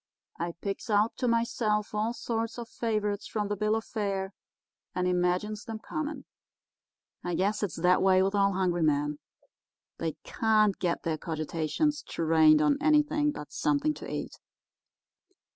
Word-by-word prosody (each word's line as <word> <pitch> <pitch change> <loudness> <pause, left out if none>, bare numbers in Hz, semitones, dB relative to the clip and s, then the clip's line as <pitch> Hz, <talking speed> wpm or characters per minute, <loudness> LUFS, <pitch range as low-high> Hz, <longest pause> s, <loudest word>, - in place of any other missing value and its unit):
I 170 0 -2
picks 200 +7 -5
out 210 +1 +2
to 255 - 0
myself 230 -3 0
all 215 +2 0
sorts 230 0 -3
of 235 -1 -6
favourites 215 -3 -2
from 210 -2 -2
the 205 - 0
bill 215 +2 +1
of 225 - -3
fare, 195 -3 -2 0.6
and 180 0 +1
imagines 180 +4 0
them 225 -1 -5
coming. 300 +4 -5 1.0
I 175 -1 -2
guess 205 +3 0
it's 205 -5 -2
that 180 +2 +3
way 190 -1 +5
with 195 +1 0
all 200 -1 +3
hungry 180 -2 0
men. 150 -1 +1 0.8
They 165 -2 -1
can't 215 -3 +2
get 175 -2 -1
their 160 -2 -1
cogitations 160 - -1
trained 155 -2 +4
on 280 - +3
anything 300 0 +3
but 150 - -9
something 305 0 +1
to - - -8
eat. - - -5
205 Hz, 150 wpm, -29 LUFS, 175-230 Hz, 1.0 s, way